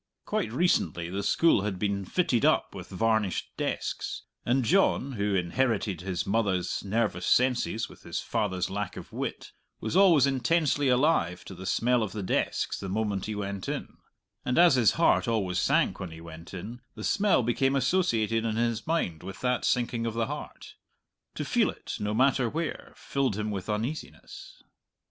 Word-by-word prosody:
Quite 110 Hz, -, -1 dB
recently 90 Hz, -, +1 dB
the 100 Hz, +2 st, -2 dB
school 165 Hz, +1 st, +3 dB
had 100 Hz, -2 st, -2 dB
been 100 Hz, 0 st, -1 dB
fitted 125 Hz, -, +1 dB
up -, -, +3 dB
with -, -, -9 dB
varnished 110 Hz, 0 st, 0 dB
desks, -, -, -3 dB, 0.2 s
and 125 Hz, +1 st, +1 dB
John, 155 Hz, -, +3 dB
who 100 Hz, -4 st, -1 dB
inherited 100 Hz, 0 st, 0 dB
his 90 Hz, -1 st, -3 dB
mother's 100 Hz, -4 st, 0 dB
nervous 110 Hz, +2 st, -1 dB
senses 125 Hz, -3 st, +2 dB
with -, -, -16 dB
his -, -, -4 dB
father's 95 Hz, -4 st, -1 dB
lack 100 Hz, -1 st, -4 dB
of -, -, -10 dB
wit, -, -, -4 dB, 0.3 s
was -, -, -3 dB
always 180 Hz, -8 st, +6 dB
intensely 140 Hz, +2 st, +1 dB
alive 125 Hz, -, +2 dB
to -, -, -8 dB
the 95 Hz, +1 st, -8 dB
smell 125 Hz, +1 st, +2 dB
of 105 Hz, -4 st, -3 dB
the 105 Hz, -2 st, -4 dB
desks 90 Hz, -, -1 dB
the 100 Hz, -, -5 dB
moment 105 Hz, -1 st, -1 dB
he 110 Hz, -, -3 dB
went 100 Hz, -2 st, -4 dB
in; -, -, -5 dB, 0.5 s
and 125 Hz, -, -1 dB
as 175 Hz, -2 st, +7 dB
his 120 Hz, -5 st, +4 dB
heart 165 Hz, -5 st, +3 dB
always 95 Hz, -6 st, 0 dB
sank -, -, +2 dB
when 95 Hz, -, -5 dB
he 80 Hz, 0 st, -10 dB
went 85 Hz, 0 st, -11 dB
in, 105 Hz, +7 st, -7 dB
the -, -, -7 dB
smell 200 Hz, -10 st, +3 dB
became 135 Hz, +4 st, +1 dB
associated 120 Hz, -, +1 dB
in 110 Hz, -1 st, -1 dB
his 115 Hz, +1 st, -1 dB
mind 125 Hz, -, -1 dB
with 95 Hz, +2 st, -8 dB
that 125 Hz, -1 st, 0 dB
sinking 120 Hz, -1 st, 0 dB
of 115 Hz, -, -4 dB
the 115 Hz, -1 st, +1 dB
heart -, -, -8 dB, 0.6 s
to -, -, -3 dB
feel -, -, +2 dB
it, -, -, -6 dB
no 105 Hz, +1 st, -1 dB
matter 130 Hz, 0 st, +3 dB
where, 165 Hz, +4 st, -4 dB
filled 135 Hz, -7 st, -1 dB
him 105 Hz, 0 st, -2 dB
with 95 Hz, 0 st, -5 dB
uneasiness. 115 Hz, +9 st, -5 dB
110 Hz, 175 wpm, -28 LUFS, 95-130 Hz, 0.6 s, as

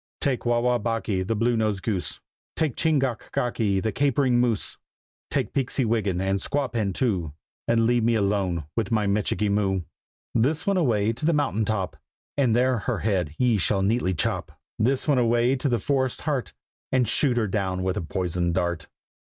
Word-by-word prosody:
"Take 130 Hz, -5 st, -1 dB
Wah 120 Hz, 0 st, +3 dB
wah 120 Hz, 0 st, +2 dB
bocky, 115 Hz, -4 st, -1 dB
the 100 Hz, +5 st, -1 dB
Blue 120 Hz, +3 st, +1 dB
nosed 105 Hz, -4 st, 0 dB
Goose! 95 Hz, -9 st, -2 dB, 0.4 s
Take 155 Hz, -6 st, 0 dB
Ching 160 Hz, -2 st, +2 dB
gach 130 Hz, -4 st, -2 dB
gocky, 110 Hz, -5 st, 0 dB
the 110 Hz, +3 st, -1 dB
Capering 135 Hz, 0 st, +2 dB
Moose! 120 Hz, -4 st, 0 dB, 0.5 s
Take -, -, -1 dB
Peeksy 135 Hz, -1 st, 0 dB
Wiggin, 105 Hz, -5 st, 0 dB
and 95 Hz, +1 st, 0 dB
Squawpan 120 Hz, -8 st, -1 dB
too, 95 Hz, -, -1 dB, 0.3 s
And 115 Hz, -1 st, +3 dB
leave 120 Hz, 0 st, +2 dB
me 115 Hz, 0 st, +3 dB
alone 100 Hz, -6 st, 0 dB
with 115 Hz, -3 st, -1 dB
my 110 Hz, -2 st, +2 dB
Michikee 105 Hz, +1 st, 0 dB
Moo! 95 Hz, -2 st, +1 dB, 0.5 s
This 145 Hz, +8 st, +1 dB
one 200 Hz, -1 st, +2 dB
away 115 Hz, -, +2 dB
to 120 Hz, -, -9 dB
the 165 Hz, +2 st, +3 dB
mountain 135 Hz, -7 st, +1 dB
top, 100 Hz, -3 st, -2 dB, 0.4 s
And 130 Hz, -6 st, +2 dB
there 125 Hz, 0 st, +2 dB
her -, -, -2 dB
head 90 Hz, -8 st, 0 dB
ye 120 Hz, -4 st, +2 dB
shall 95 Hz, +2 st, +2 dB
neatly 100 Hz, -3 st, +1 dB
chop. -, -, -2 dB, 0.2 s
This 130 Hz, +7 st, +1 dB
one 140 Hz, -4 st, +3 dB
away 120 Hz, +2 st, +3 dB
to 135 Hz, +2 st, -1 dB
the 120 Hz, -, +2 dB
forest's 130 Hz, -1 st, -1 dB
heart, 145 Hz, -5 st, -2 dB, 0.4 s
And 130 Hz, -3 st, +2 dB
shoot 125 Hz, +2 st, +2 dB
her 115 Hz, -, +2 dB
down 95 Hz, -2 st, -1 dB
with 95 Hz, 0 st, 0 dB
a -, -, -2 dB
poisoned 85 Hz, 0 st, -1 dB
dart. 85 Hz, -4 st, -1 dB
115 Hz, 185 wpm, -25 LUFS, 100-125 Hz, 0.5 s, Wah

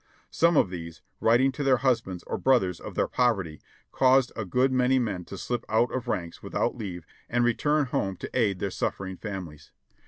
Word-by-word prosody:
Some 170 Hz, -1 st, +3 dB
of 95 Hz, -, +3 dB
these, 85 Hz, -2 st, -8 dB, 0.2 s
writing 120 Hz, +4 st, +4 dB
to 145 Hz, +2 st, -4 dB
their 135 Hz, -2 st, +4 dB
husbands 115 Hz, -8 st, 0 dB
or -, -, -4 dB
brothers 95 Hz, -10 st, +2 dB
of -, -, -9 dB
their -, -, +1 dB
pov 120 Hz, -3 st, +2 dB
erty, 80 Hz, -5 st, -7 dB, 0.3 s
caused 130 Hz, -1 st, +4 dB
a 110 Hz, -, -3 dB
good 125 Hz, +8 st, +2 dB
many 130 Hz, 0 st, +3 dB
men 100 Hz, -8 st, -2 dB
to 100 Hz, -, -8 dB
slip 120 Hz, +4 st, -3 dB
out 110 Hz, +3 st, +2 dB
of 125 Hz, -1 st, -4 dB
ranks 85 Hz, -7 st, -3 dB
without -, -, -1 dB
leave 90 Hz, -7 st, -6 dB, 0.2 s
and 120 Hz, 0 st, +1 dB
return 145 Hz, +5 st, +2 dB
home 95 Hz, -7 st, -2 dB
to -, -, -7 dB
aid 105 Hz, -7 st, +2 dB
their 100 Hz, 0 st, -3 dB
suffering 95 Hz, 0 st, -3 dB
families. 90 Hz, -8 st, -7 dB
115 Hz, 195 wpm, -27 LUFS, 95-130 Hz, 0.3 s, writing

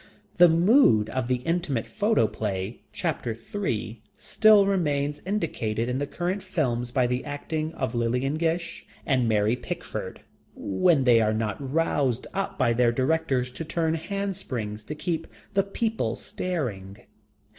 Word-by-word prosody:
The 175 Hz, -1 st, +8 dB
Mood 165 Hz, -, +4 dB
of 130 Hz, -2 st, -2 dB
the 125 Hz, -1 st, -1 dB
intimate 165 Hz, -, 0 dB
photoplay, 110 Hz, -, 0 dB
chapter 115 Hz, -2 st, -2 dB
three, 115 Hz, -, -4 dB, 0.2 s
still 215 Hz, -2 st, +5 dB
remains 150 Hz, -6 st, 0 dB
indicated 120 Hz, -, -1 dB
in 125 Hz, +1 st, -1 dB
the 145 Hz, -, -2 dB
current 180 Hz, +6 st, -2 dB
films 130 Hz, -11 st, -1 dB
by 125 Hz, +1 st, +2 dB
the 125 Hz, +1 st, -1 dB
acting 155 Hz, +2 st, -3 dB
of 130 Hz, -4 st, -2 dB
Lillian 125 Hz, +4 st, 0 dB
Gish 165 Hz, +2 st, -2 dB, 0.2 s
and 130 Hz, -5 st, +2 dB
Mary 105 Hz, +1 st, +2 dB
Pickford, -, -, -6 dB, 0.3 s
when 135 Hz, -, +2 dB
they 120 Hz, -3 st, +5 dB
are 110 Hz, 0 st, +2 dB
not 110 Hz, -1 st, -1 dB
roused 135 Hz, -3 st, 0 dB
up 195 Hz, 0 st, -3 dB
by 120 Hz, -, +3 dB
their 120 Hz, 0 st, +3 dB
directors 130 Hz, -1 st, 0 dB
to 125 Hz, -, -6 dB
turn 160 Hz, 0 st, 0 dB
handsprings 160 Hz, -, -4 dB
to 150 Hz, -, -5 dB
keep 165 Hz, +1 st, -2 dB, 0.3 s
the 200 Hz, -, +4 dB
people 220 Hz, +3 st, -2 dB
staring. 110 Hz, -, -4 dB
135 Hz, 140 wpm, -26 LUFS, 115-170 Hz, 0.3 s, The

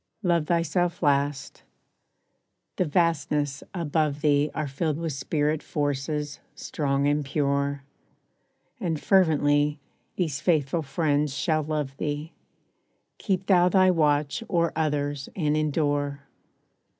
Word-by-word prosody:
Love 170 Hz, -4 st, +1 dB
thyself 175 Hz, +1 st, 0 dB
last. 140 Hz, -1 st, 0 dB, 1.2 s
The 185 Hz, -, +2 dB
vastnesses 150 Hz, -3 st, 0 dB
above 155 Hz, -4 st, -1 dB
thee 145 Hz, -1 st, +3 dB
Are 155 Hz, -2 st, -2 dB
filled 150 Hz, +2 st, -2 dB
with 165 Hz, -2 st, -3 dB
Spirit 150 Hz, +2 st, -1 dB
Forces, 145 Hz, 0 st, -2 dB, 0.2 s
strong 140 Hz, -2 st, -1 dB
and 145 Hz, +1 st, +1 dB
pure. 140 Hz, 0 st, -1 dB, 1.0 s
And 160 Hz, -3 st, -2 dB
fervently, 150 Hz, -5 st, +3 dB, 0.4 s
these 155 Hz, -7 st, -2 dB
faithful 160 Hz, -1 st, +1 dB
friends 145 Hz, -1 st, 0 dB
shall 155 Hz, +1 st, +1 dB
love 150 Hz, -3 st, -3 dB
thee: 150 Hz, +2 st, -4 dB, 0.9 s
Keep 190 Hz, -2 st, -1 dB
thou 180 Hz, -2 st, +4 dB
thy 185 Hz, 0 st, +5 dB
watch 150 Hz, +3 st, +1 dB
o'er 170 Hz, -3 st, +1 dB
others 145 Hz, -3 st, -1 dB
and 150 Hz, -5 st, +1 dB
endure. 145 Hz, -2 st, 0 dB
150 Hz, 110 wpm, -26 LUFS, 145-165 Hz, 1.2 s, thy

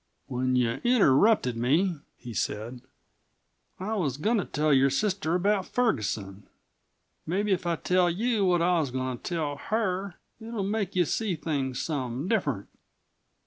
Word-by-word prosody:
"When 130 Hz, 0 st, -1 dB
you 120 Hz, -2 st, +1 dB
interrupted 205 Hz, -, +4 dB
me," 155 Hz, +9 st, +1 dB, 0.2 s
he 120 Hz, -2 st, -9 dB
said, 115 Hz, +4 st, -3 dB, 1.0 s
"I 200 Hz, +4 st, -3 dB
was 150 Hz, -, -1 dB
goin' 220 Hz, +10 st, +1 dB
to 200 Hz, -, -1 dB
tell 150 Hz, 0 st, +1 dB
your 135 Hz, 0 st, +5 dB
sister 175 Hz, +3 st, 0 dB
about 195 Hz, +1 st, +1 dB
Ferguson. 105 Hz, -, -1 dB, 0.8 s
Mebbe 200 Hz, +5 st, 0 dB
if 185 Hz, -2 st, 0 dB
I 170 Hz, -, +1 dB
tell 180 Hz, +1 st, +2 dB
you 215 Hz, +4 st, 0 dB
what 175 Hz, -2 st, +3 dB
I 175 Hz, 0 st, +3 dB
was 150 Hz, -4 st, -1 dB
goin' 130 Hz, -1 st, -3 dB
to -, -, -32 dB
tell 155 Hz, -5 st, -2 dB
her 195 Hz, -2 st, -2 dB, 0.2 s
it'll 225 Hz, -2 st, -4 dB
make 200 Hz, -1 st, -2 dB
you 180 Hz, -1 st, +3 dB
see 205 Hz, +3 st, -1 dB
things 140 Hz, -5 st, -2 dB
some 135 Hz, -1 st, -3 dB
different. 145 Hz, -, 0 dB
170 Hz, 150 wpm, -27 LUFS, 130-200 Hz, 1.0 s, your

